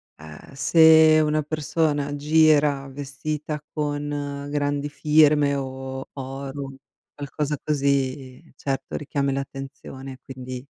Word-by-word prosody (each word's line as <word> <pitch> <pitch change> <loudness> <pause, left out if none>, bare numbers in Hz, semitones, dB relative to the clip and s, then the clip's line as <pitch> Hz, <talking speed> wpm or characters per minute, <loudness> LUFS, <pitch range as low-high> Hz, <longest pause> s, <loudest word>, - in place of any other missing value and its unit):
ehm, 80 - -13
se 160 +1 +6
una 155 0 +1
persona 145 -1 -1
gira 150 -2 +3
vestita 145 +2 -5
con 145 -1 -3
grandi 145 0 -1
firme, 150 -1 +4
o 130 0 -5
oro, 135 0 -6 0.4
qualcosa 145 +1 -3
così 135 -3 -1
certo 135 -1 -4
richiami 140 -2 -1
l'attenzione, 135 -1 -7
quindi 130 0 -8
145 Hz, 95 wpm, -24 LUFS, 135-150 Hz, 0.4 s, se